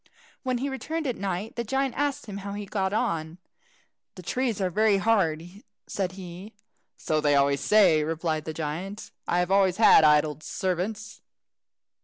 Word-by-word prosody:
When 255 Hz, -2 st, -1 dB
he 265 Hz, +4 st, -2 dB
returned 310 Hz, +4 st, -4 dB
at 255 Hz, -4 st, -1 dB
night 195 Hz, +2 st, -4 dB
the 235 Hz, -, -2 dB
giant 270 Hz, +2 st, -1 dB
asked 285 Hz, 0 st, -1 dB
him 205 Hz, -3 st, -7 dB
how 200 Hz, 0 st, -6 dB
he 205 Hz, 0 st, -5 dB
got 190 Hz, -1 st, -2 dB
on. 165 Hz, -5 st, -2 dB, 0.8 s
"The 185 Hz, -, -10 dB
trees 245 Hz, +2 st, -1 dB
are 185 Hz, -2 st, 0 dB
very 215 Hz, +2 st, +3 dB
hard," 190 Hz, -7 st, +1 dB, 0.4 s
said 185 Hz, -2 st, -3 dB
he. 185 Hz, +2 st, -10 dB, 0.4 s
"So 155 Hz, -1 st, -1 dB
they 145 Hz, -1 st, +3 dB
always 140 Hz, 0 st, +2 dB
say," 190 Hz, -8 st, +4 dB
replied 160 Hz, 0 st, -2 dB
the 160 Hz, -, -3 dB
giant; 175 Hz, +7 st, -5 dB, 0.2 s
"I 175 Hz, -, +1 dB
have 180 Hz, +1 st, 0 dB
always 195 Hz, -2 st, +3 dB
had 215 Hz, -7 st, +7 dB
idle 150 Hz, 0 st, +3 dB
servants." 205 Hz, +5 st, -3 dB
195 Hz, 165 wpm, -26 LUFS, 165-220 Hz, 0.8 s, had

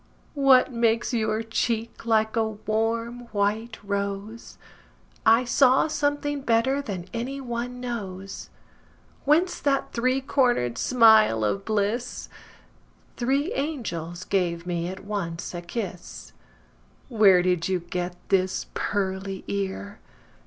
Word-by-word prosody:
What 270 Hz, -3 st, +5 dB
makes 230 Hz, +1 st, +1 dB
your 220 Hz, -1 st, 0 dB
cheek 230 Hz, 0 st, -2 dB
like 220 Hz, -1 st, +2 dB
a 225 Hz, -, +3 dB
warm 225 Hz, +3 st, -2 dB
white 215 Hz, +2 st, -1 dB
rose?I 205 Hz, +3 st, -2 dB
saw 255 Hz, +3 st, +4 dB
something 290 Hz, -1 st, -1 dB
better 260 Hz, +3 st, +2 dB
than 190 Hz, -9 st, -5 dB
any 250 Hz, +4 st, -3 dB
one 245 Hz, -1 st, -4 dB
knows. 195 Hz, -6 st, -6 dB, 0.8 s
Whence 335 Hz, +5 st, +3 dB
that 275 Hz, -1 st, 0 dB
three 255 Hz, +2 st, +1 dB
corner'd 245 Hz, -, +1 dB
smile 220 Hz, -, +5 dB
of 195 Hz, -, -1 dB
bliss? 215 Hz, +3 st, -1 dB, 0.9 s
Three 275 Hz, +6 st, 0 dB
angels 185 Hz, -, -4 dB
gave 175 Hz, -3 st, -1 dB
me 175 Hz, -1 st, -2 dB
at 190 Hz, +1 st, -7 dB
once 180 Hz, -6 st, -4 dB
a 175 Hz, -, -5 dB
kiss. 180 Hz, -1 st, -6 dB, 0.7 s
Where 200 Hz, -7 st, +5 dB
did 180 Hz, -2 st, +1 dB
you 190 Hz, -1 st, +1 dB
get 175 Hz, 0 st, -4 dB
this 185 Hz, -1 st, +1 dB
pearly 190 Hz, -1 st, -2 dB
ear? 200 Hz, +1 st, -4 dB
220 Hz, 110 wpm, -25 LUFS, 190-245 Hz, 0.9 s, What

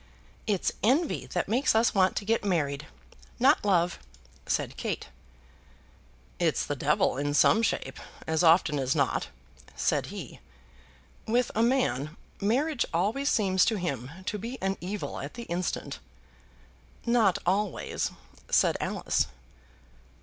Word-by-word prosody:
"It's 200 Hz, -4 st, +1 dB
envy 275 Hz, -, +1 dB
that 180 Hz, -, -2 dB
makes 240 Hz, +4 st, +2 dB
us 225 Hz, +1 st, +3 dB
want 190 Hz, -2 st, +3 dB
to 200 Hz, -, -2 dB
get 225 Hz, +1 st, +1 dB
married, 150 Hz, -7 st, -1 dB, 0.5 s
not 270 Hz, +5 st, +4 dB
love," 180 Hz, -4 st, +2 dB, 0.5 s
said -, -, -1 dB
Kate. -, -, -4 dB, 1.3 s
"It's -, -, +1 dB
the -, -, -2 dB
devil -, -, +1 dB
in 145 Hz, +1 st, -1 dB
some 220 Hz, -, +5 dB
shape, 230 Hz, -, -1 dB, 0.3 s
as 160 Hz, 0 st, +1 dB
often 160 Hz, -3 st, +5 dB
as 130 Hz, +1 st, 0 dB
not," 140 Hz, -3 st, +1 dB, 0.5 s
said -, -, 0 dB
he. -, -, -8 dB, 0.9 s
"With 240 Hz, +2 st, +1 dB
a 220 Hz, -, +1 dB
man, 230 Hz, -, +1 dB, 0.2 s
marriage 250 Hz, +7 st, +1 dB
always 215 Hz, -, +1 dB
seems 190 Hz, -4 st, +3 dB
to 225 Hz, -, +1 dB
him 140 Hz, -, -3 dB, 0.2 s
to 210 Hz, +1 st, -2 dB
be 235 Hz, +5 st, -6 dB
an 195 Hz, 0 st, 0 dB
evil 195 Hz, +4 st, -4 dB
at -, -, -7 dB
the 240 Hz, -, -6 dB
instant." 175 Hz, -4 st, -3 dB, 1.1 s
"Not 230 Hz, -6 st, +3 dB
always," 195 Hz, +1 st, 0 dB, 0.4 s
said -, -, +3 dB
Alice. -, -, 0 dB
200 Hz, 130 wpm, -28 LUFS, 170-230 Hz, 1.3 s, some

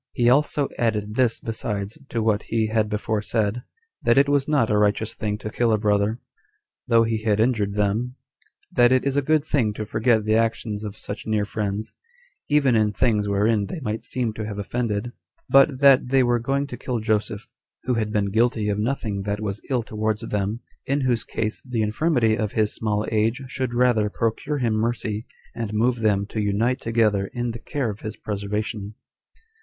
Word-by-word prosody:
He 120 Hz, 0 st, +3 dB
also 145 Hz, +1 st, +2 dB
added 105 Hz, -3 st, 0 dB
this 120 Hz, -1 st, +2 dB
besides 105 Hz, -2 st, -3 dB
to 115 Hz, -2 st, -1 dB
what 110 Hz, -1 st, +2 dB
he 110 Hz, -1 st, +1 dB
had 110 Hz, -1 st, +1 dB
before 105 Hz, 0 st, -1 dB
said, 110 Hz, +1 st, -1 dB, 0.4 s
that 120 Hz, +1 st, +3 dB
it 140 Hz, +1 st, +5 dB
was 145 Hz, -1 st, +2 dB
not 140 Hz, -8 st, +2 dB
a 105 Hz, -, +3 dB
righteous 105 Hz, +1 st, +1 dB
thing 105 Hz, -1 st, -3 dB
to 105 Hz, 0 st, -6 dB
kill 120 Hz, 0 st, +1 dB
a 110 Hz, -, +3 dB
brother, 105 Hz, +2 st, +1 dB, 0.7 s
though 115 Hz, -1 st, +5 dB
he 115 Hz, -1 st, -1 dB
had 110 Hz, -1 st, +1 dB
injured 110 Hz, -4 st, +1 dB
them; 105 Hz, +5 st, 0 dB, 0.6 s
that 120 Hz, 0 st, +4 dB
it 130 Hz, 0 st, +3 dB
is 140 Hz, -1 st, 0 dB
a 145 Hz, -, +3 dB
good 155 Hz, +1 st, +2 dB
thing 125 Hz, -9 st, +1 dB
to 105 Hz, +1 st, -5 dB
forget 110 Hz, 0 st, +1 dB
the 110 Hz, -, +2 dB
actions 110 Hz, -1 st, 0 dB
of 105 Hz, -1 st, -6 dB
such 100 Hz, -, -6 dB
near 105 Hz, -1 st, +1 dB
friends, 105 Hz, +1 st, -3 dB, 0.6 s
even 140 Hz, -4 st, +4 dB
in 110 Hz, -1 st, +3 dB
things 105 Hz, -2 st, +1 dB
wherein 100 Hz, +1 st, +2 dB
they 175 Hz, -, -5 dB
might 110 Hz, -3 st, -3 dB
seem 120 Hz, -4 st, -1 dB
to 110 Hz, -, -5 dB
have 105 Hz, -1 st, -5 dB
offended; 110 Hz, +1 st, -2 dB, 0.4 s
but 135 Hz, 0 st, +4 dB
that 135 Hz, -3 st, +6 dB
they 130 Hz, 0 st, +4 dB
were 120 Hz, -1 st, +2 dB
going 135 Hz, +4 st, 0 dB
to 125 Hz, -3 st, -8 dB
kill 125 Hz, 0 st, -3 dB
Joseph, 105 Hz, -1 st, -1 dB, 0.4 s
who 125 Hz, -, 0 dB
had 110 Hz, -2 st, -1 dB
been 100 Hz, -2 st, 0 dB
guilty 110 Hz, -1 st, +2 dB
of 100 Hz, 0 st, -1 dB
nothing 110 Hz, -4 st, -2 dB
that 100 Hz, +1 st, -2 dB
was 105 Hz, -1 st, -4 dB
ill 125 Hz, -3 st, +1 dB
towards 110 Hz, 0 st, -2 dB
them, 105 Hz, 0 st, -2 dB, 0.3 s
in 140 Hz, +2 st, +1 dB
whose 120 Hz, -3 st, +1 dB
case 110 Hz, -1 st, -3 dB
the 125 Hz, -4 st, -1 dB
infirmity 115 Hz, 0 st, +2 dB
of 110 Hz, -1 st, -2 dB
his 110 Hz, -1 st, +1 dB
small 105 Hz, -1 st, -1 dB
age 115 Hz, +5 st, +1 dB
should 130 Hz, -2 st, -3 dB
rather 120 Hz, -4 st, +3 dB
procure 115 Hz, +7 st, -1 dB
him 120 Hz, -5 st, 0 dB
mercy, 110 Hz, -1 st, -2 dB, 0.3 s
and 110 Hz, -2 st, -4 dB
move 120 Hz, +2 st, +2 dB
them 105 Hz, -3 st, +2 dB
to 110 Hz, +1 st, -3 dB
unite 110 Hz, +6 st, 0 dB
together 110 Hz, -4 st, +1 dB
in 120 Hz, -1 st, -2 dB
the 115 Hz, -, -7 dB
care 130 Hz, -1 st, -2 dB
of 105 Hz, -, -10 dB
his 110 Hz, -, -6 dB
preservation. 105 Hz, 0 st, -4 dB
110 Hz, 195 wpm, -23 LUFS, 105-120 Hz, 0.7 s, that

